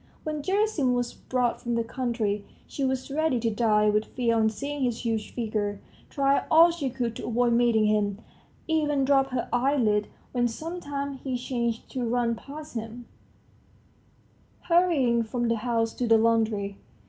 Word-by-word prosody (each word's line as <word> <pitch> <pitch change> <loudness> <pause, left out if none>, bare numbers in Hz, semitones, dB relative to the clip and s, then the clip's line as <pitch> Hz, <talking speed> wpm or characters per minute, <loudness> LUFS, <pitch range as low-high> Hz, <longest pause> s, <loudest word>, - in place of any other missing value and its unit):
When 305 -1 -3
Gerasim 375 - +1
was 245 -1 -2
brought 250 -2 -1
from 240 -1 -2
the 230 - +1
country, 225 -4 -2 0.2
she 280 - -5
was 265 0 -1
ready 310 -3 +1
to 230 -1 +1
die 210 -1 +3
with 210 +1 +2
fear 235 -3 0
on 220 -1 +3
seeing 280 +7 -5
his 240 -1 -2
huge 225 -2 -1
figure, 210 -3 -2 0.3
tried 275 0 +1
all 330 +2 +7
she 315 -6 -3
could 240 -2 -3
to - - -6
avoid 240 0 +2
meeting 235 -2 +3
him, 210 -2 +1 0.5
even 295 -4 +1
dropped 270 -1 +3
her 255 -2 -2
eyelids 245 -5 +2 0.2
when 245 -1 +1
sometimes 280 0 -5
she 260 -2 -2
chanced 235 -2 -2
to 255 - -3
run 235 0 +1
past 290 +6 -9
him, 230 +1 -6 1.6
hurrying 325 -10 +3
from 240 +1 -2
the 230 - +1
house 225 0 0
to 245 - -2
the 225 0 +6
laundry. 220 -3 +1
240 Hz, 160 wpm, -26 LUFS, 225-275 Hz, 1.6 s, all